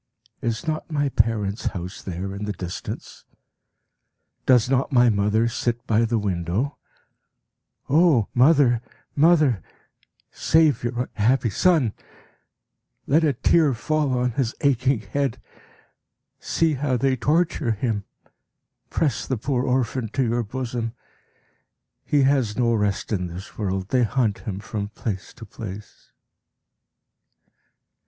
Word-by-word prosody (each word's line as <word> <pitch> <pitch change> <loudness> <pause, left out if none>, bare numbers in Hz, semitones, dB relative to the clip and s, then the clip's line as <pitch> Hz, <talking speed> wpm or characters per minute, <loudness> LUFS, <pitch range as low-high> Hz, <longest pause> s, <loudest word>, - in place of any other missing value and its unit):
Is 115 +3 -2
not 155 +1 -2
my 145 -2 0
parents' 110 -4 0
house 90 +3 -7
there 95 +1 -5
in 100 +1 -5
the 105 - -3
distance? 90 -1 -7 1.2
Does 125 -3 +5
not 135 +2 +1
my 125 -2 +5
mother 105 +3 +2
sit 120 +1 -2
by 110 +1 +2
the 115 0 0
window? 100 - -2 1.1
O 150 - +4
mother, 130 -3 +4 0.3
mother, 150 - +4 0.7
save 155 -7 +3
your 120 +1 -2
unhappy 120 +2 +2
son! 155 - +3 1.1
Let 155 +4 +3
a 155 - +4
tear 140 +2 +3
fall 140 +2 0
on 125 0 +1
his 120 0 -1
aching 130 -3 +2
head! 135 0 -2 1.0
See 165 -2 +1
how 135 -2 0
they 130 +2 +2
torture 150 -1 +1
him! 105 -1 -2 0.9
Press 150 -5 -1
the 130 - -1
poor 125 +2 -1
orphan 125 -2 0
to 135 - +1
your 120 0 0
bosom! 120 0 -4 1.1
He 145 -2 +2
has 130 -6 +2
no 120 -2 +2
rest 105 -2 -1
in 90 -3 -1
this 90 +3 -9
world; 95 -2 -3
they 130 - +2
hunt 115 -3 +1
him 100 -4 -5
from 105 -1 -4
place 105 -3 -5
to 115 - -10
place. 105 -1 -10
120 Hz, 125 wpm, -23 LUFS, 105-135 Hz, 1.2 s, Does